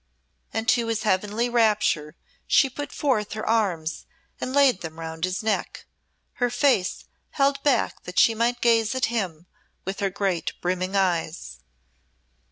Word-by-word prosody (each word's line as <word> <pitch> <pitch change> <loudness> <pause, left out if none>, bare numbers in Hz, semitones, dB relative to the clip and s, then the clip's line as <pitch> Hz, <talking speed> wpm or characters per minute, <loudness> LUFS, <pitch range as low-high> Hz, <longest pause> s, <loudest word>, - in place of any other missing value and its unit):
And 225 0 -3
to 235 -2 +3
his 225 -1 -1
heavenly 210 +4 +1
rapture 215 -10 +1 0.3
she 270 - +4
put 290 +3 -6
forth 220 -9 0
her 215 - -5
arms 185 -8 0 0.3
and 255 - -3
laid 270 -7 +4
them 165 -1 -7
round 160 +1 -3
his 185 +2 -3
neck, 220 - -2 0.6
her 245 - +3
face 245 -6 +1 0.2
held 275 -1 +1
back 275 -5 +1
that 180 - -8
she 230 - +6
might 235 +2 0
gaze 230 0 +3
at 260 - +2
him 180 -7 -3 0.4
with 190 +1 -4
her 200 - +1
great 190 -3 -2
brimming 185 +2 -2
eyes. 170 - -1
215 Hz, 150 wpm, -25 LUFS, 180-240 Hz, 0.6 s, she